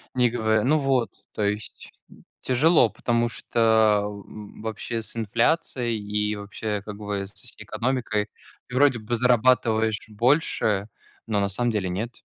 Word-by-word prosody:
Не 125 -1 +4
гово 110 -2 +1
ну 150 +6 +3
вот. 135 -4 +1 0.2
То - - -4
есть 105 +1 -4 0.5
тяжело, 130 0 +4
потому 120 +1 0
что 110 -3 +3 0.6
вообще 115 +1 -4
с 110 - -4
инфляцией, 120 +1 0
и 105 0 -1
вообще, 105 +1 -4
как 105 -1 -7
бы, 100 -2 -3
с 100 - -10
экономикой 115 -4 -1 0.4
ты 125 - -8
вроде 135 -3 +4
бы 110 +3 -2
зарабатываешь 115 -2 +2
больше, 110 -4 +1 0.4
но 110 -2 0
на 100 0 0
самом 120 +4 0
деле 100 -4 -1
нет. 110 +7 -3
110 Hz, 135 wpm, -25 LUFS, 105-125 Hz, 0.6 s, Не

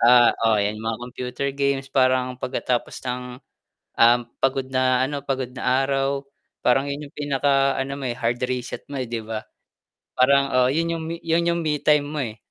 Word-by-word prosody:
Ah, 120 0 +7 0.2
oo 110 - +4
'yan 105 +1 -1
mga 110 0 -2
computer 125 +2 -4
games, 140 -1 -1
parang 130 -1 +3
pagkatapos 125 -1 -2
ng 125 0 -3 0.8
um, 120 +1 +7 0.2
pagod 135 0 +1
na 130 0 +3
ano, 140 0 -4
pagod 130 -2 -3
na 130 +1 +1
araw 135 0 -1 0.4
parang 135 +3 +3
'yon 145 +1 -4
'yong, 140 - -15
pinakaano 140 -1 +1
mo, 135 -2 -4
eh, 120 - -4
hard 120 +2 -1
reset 125 -1 -3
mo, 140 - -5
eh, 130 - -2
'di 115 0 -3
ba? 110 0 -5 0.7
Parang, 140 +2 +3
oo, 125 0 +4
yun 165 +5 0
'yong, 165 -1 -3 0.2
yun 170 +1 +2
'yong 170 0 +1
me-time 150 -1 +2
mo, 150 +1 -4
eh. 110 -4 -4
135 Hz, 180 wpm, -23 LUFS, 125-140 Hz, 0.8 s, Ah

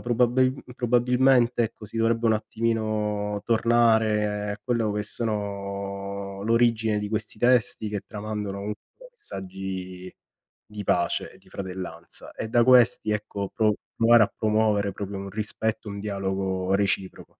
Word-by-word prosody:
Probabil 125 +2 +2 0.2
probabilmente 125 0 +3
ecco, 110 - -7
si 110 - -9
dovrebbe 115 +1 +2
un 110 - +4
attimino 110 -2 -1
tornare 110 -3 +2
a 105 - -5
quello 115 -2 0
che 105 - -1
sono 100 -2 -4
l'origine 115 -2 +2
di 105 - -3
questi 110 +1 -4
testi, 120 -3 +3
che 105 -2 -3
tramandano 105 -2 -4
comunque 105 - -8
messaggi 95 - -7 0.5
di 105 -1 -8
pace 85 -1 0
e - - -18
di - - -23
fratellanza. 90 -3 -7
E - - -5
da 120 +2 +4
questi 125 -3 +5
ecco 105 -2 -3
pro 110 -2 +2 0.2
provare 115 0 +6
a 105 - +1
promuovere 105 -2 +1
proprio 100 0 -5
un 100 0 -6
rispetto, 110 +1 -3
un 100 0 -5
dialogo 95 -2 -1
reciproco. 100 -1 -1
105 Hz, 135 wpm, -26 LUFS, 100-115 Hz, 0.5 s, provare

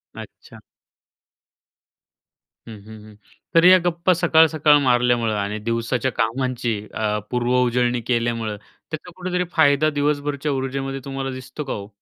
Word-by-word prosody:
अच्छा. - - -12 2.1
हं, 115 - -8
हं, 110 0 -12
हं. 105 -1 -15 0.4
तरी 165 +2 +7
या 185 - +8
गप्पा 175 +1 +2
सकाळ-सकाळ 160 -3 +4
मारल्यामुळे 120 -3 +2
आणि 100 +1 -3
दिवसाच्या 115 +3 -2
कामांची 120 +1 -1 0.2
अ, 105 -1 -1
पूर्व 125 0 0
उजळणी 120 0 0
केल्यामुळे 115 -2 -1
त्याचा 155 +10 -11
कुठेतरी 180 0 -2
फायदा 155 -1 +3
दिवसभरच्या 145 0 -1
ऊर्जेमध्ये 135 0 -3
तुम्हाला 135 -1 -4
दिसतो 130 +3 -7
का 135 - -4
ओ? 100 -1 -7
130 Hz, 125 wpm, -21 LUFS, 115-150 Hz, 2.1 s, या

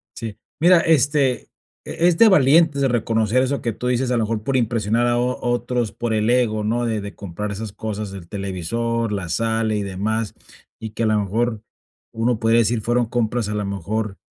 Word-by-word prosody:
Sí, 110 -3 -6 0.2
mira, 175 +1 +6
este, 145 -4 +2 0.4
e 170 - +1
es 170 -2 +2
de 225 -1 +7
valientes 150 -3 +4
reconocer 115 -1 +1
eso 135 +2 -1
que 115 -2 -2
tú 125 - -5
dices, 125 0 0
a 120 - +2
lo 115 - +1
mejor 110 0 -2
por 135 +1 -1
impresionar 115 0 +1
a 120 0 +2
o 125 +1 -1
otros, 120 -2 -1
por 120 +1 -3
el 110 +1 +1
ego, 115 -4 +2
¿no? 120 +3 0
De 110 -2 -1
de 100 0 -8
comprar 100 +2 -5
esas 105 0 -5
cosas 105 -1 -5
del 95 -4 -9
televisor, 105 +5 -2
la 95 -5 -3
sala 110 +4 0
y 105 - -1
demás, 105 +3 -2 0.4
y 110 -1 -6
que 115 - -3
a - - +2
la 110 0 +2
mejor 110 +2 -1 0.5
uno 115 0 0
puede 115 0 +3
decir: 115 0 +2
"Fueron 120 +1 +1
compras 115 -2 -1
a 105 - -2
la 105 - -2
mejor, 100 +2 -3
115 Hz, 200 wpm, -21 LUFS, 105-120 Hz, 0.5 s, de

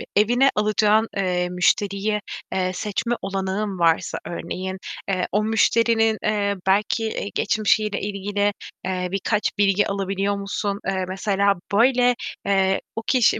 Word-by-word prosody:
evine 245 +6 +4
alacağın, 215 +1 +3
eee, 180 -2 0
müşteriye, 200 +3 +1 0.3
eee, 185 -1 0
seçme 220 +5 -2
olanağın 195 0 -2
varsa 165 -1 +2
örneğin, 185 +2 -5 0.3
eee, 185 -2 0
o 210 +2 +1
müşterinin, 225 0 +3
eee, 205 -1 +1
belki 210 +1 0
geçmişiyle 215 -1 +1
ilgili, 205 0 -1 0.3
eee, 185 -1 -1
birkaç 205 +2 0
bilgi 200 0 +3
alabiliyor 195 0 -1
musun? 200 0 -3
Eee, 190 -1 -1
mesela 200 +1 +1 0.2
böyle, 245 +2 +4 0.3
eee, 195 -1 +2
o 225 - -2
kişi 255 -4 +3
200 Hz, 120 wpm, -23 LUFS, 190-215 Hz, 0.3 s, evine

